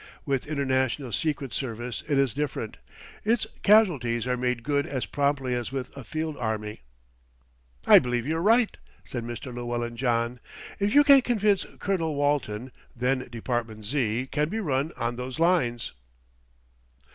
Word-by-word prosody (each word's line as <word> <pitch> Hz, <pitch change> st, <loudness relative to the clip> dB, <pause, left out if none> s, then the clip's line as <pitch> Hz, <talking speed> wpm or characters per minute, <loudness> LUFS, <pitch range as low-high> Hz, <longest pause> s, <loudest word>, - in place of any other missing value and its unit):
"With 135 Hz, -2 st, -1 dB
international 130 Hz, -3 st, 0 dB
secret 145 Hz, -4 st, -1 dB
service 120 Hz, -2 st, -4 dB
it 145 Hz, -3 st, +1 dB
is 135 Hz, -5 st, +2 dB
different; 140 Hz, -6 st, -3 dB, 0.5 s
its 225 Hz, +2 st, +2 dB, 0.2 s
casualties 145 Hz, -, +4 dB
are 125 Hz, 0 st, +1 dB
made 125 Hz, -1 st, -1 dB
good 145 Hz, +2 st, 0 dB
as 130 Hz, -8 st, -2 dB
promptly 140 Hz, +2 st, 0 dB
as 120 Hz, 0 st, -2 dB
with 135 Hz, -2 st, -5 dB
a 135 Hz, -, -8 dB
field 155 Hz, +4 st, -3 dB
army." 105 Hz, -, -3 dB, 1.0 s
"I -, -, +9 dB
believe 125 Hz, -1 st, -1 dB
you're 160 Hz, +3 st, -1 dB
right," 225 Hz, +4 st, +4 dB, 0.3 s
said 120 Hz, -2 st, -5 dB
Mr. 120 Hz, +2 st, -6 dB
Llewellyn 120 Hz, -1 st, -3 dB
John. 120 Hz, 0 st, 0 dB, 0.4 s
"If 205 Hz, +3 st, +1 dB
you 290 Hz, -, +8 dB
can 280 Hz, -2 st, +8 dB
convince 210 Hz, -5 st, +1 dB
Colonel 165 Hz, -6 st, -1 dB
Walton, 130 Hz, -5 st, 0 dB, 0.2 s
then 130 Hz, +1 st, 0 dB
Department 115 Hz, -2 st, -3 dB
Z. 120 Hz, -1 st, 0 dB
can 150 Hz, +1 st, +1 dB
be 220 Hz, -, -2 dB
run 145 Hz, -5 st, 0 dB
on 120 Hz, 0 st, -2 dB
those 125 Hz, +1 st, -5 dB
lines." 160 Hz, -9 st, +1 dB
130 Hz, 145 wpm, -27 LUFS, 120-155 Hz, 1.0 s, I